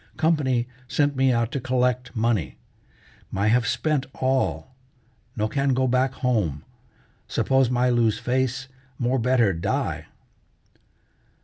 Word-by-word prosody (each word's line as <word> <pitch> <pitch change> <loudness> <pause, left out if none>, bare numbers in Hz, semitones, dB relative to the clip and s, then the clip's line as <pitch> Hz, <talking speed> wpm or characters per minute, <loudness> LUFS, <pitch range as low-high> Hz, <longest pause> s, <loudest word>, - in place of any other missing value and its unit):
"Company 130 -7 +1 0.2
sent 145 +2 +1
me 130 0 +3
out 115 -1 0
to 140 - -2
collect 125 0 0
money. 110 -6 0 0.7
My 100 +2 0
have 115 0 +2
spent 150 +2 0
all. 130 0 -1 0.6
No 110 -1 0
can 140 +2 0
go 130 0 +1
back 130 +1 +1
home. 105 - -1 0.6
Suppose 135 -2 +2
my 125 0 +2
lose 115 -3 +2
face, 130 +1 -1 0.3
more 125 +2 0
better 120 -4 +3
die!" 85 0 -2
125 Hz, 120 wpm, -24 LUFS, 115-130 Hz, 0.7 s, me